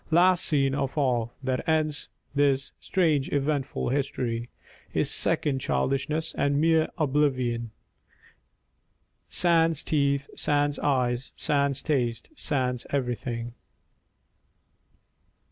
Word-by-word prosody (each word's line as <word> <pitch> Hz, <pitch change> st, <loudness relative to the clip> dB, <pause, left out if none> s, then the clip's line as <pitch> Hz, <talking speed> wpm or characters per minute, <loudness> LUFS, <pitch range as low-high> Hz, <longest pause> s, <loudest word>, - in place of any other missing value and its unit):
Last 175 Hz, +2 st, +4 dB
scene 135 Hz, -3 st, +2 dB
of 135 Hz, +1 st, -2 dB
all, 120 Hz, -5 st, +1 dB
That 130 Hz, +3 st, -1 dB
ends 155 Hz, -2 st, 0 dB, 0.2 s
this 140 Hz, -2 st, +2 dB
strange 155 Hz, -7 st, +1 dB
eventful 140 Hz, -2 st, -1 dB
history, 125 Hz, -3 st, -2 dB, 0.5 s
Is -, -, +1 dB
second 140 Hz, -3 st, +2 dB
childishness 150 Hz, +5 st, -1 dB
and 140 Hz, 0 st, +1 dB
mere 160 Hz, 0 st, +3 dB
oblivion, 130 Hz, -6 st, +1 dB, 1.6 s
Sans 165 Hz, -3 st, +3 dB
teeth, 140 Hz, -2 st, +1 dB
sans 145 Hz, -1 st, +1 dB
eyes, 125 Hz, -2 st, 0 dB
sans 140 Hz, -3 st, +1 dB
taste, 120 Hz, -6 st, -1 dB
sans 130 Hz, -, -1 dB
everything. 120 Hz, -3 st, -3 dB
140 Hz, 95 wpm, -27 LUFS, 130-150 Hz, 1.6 s, Last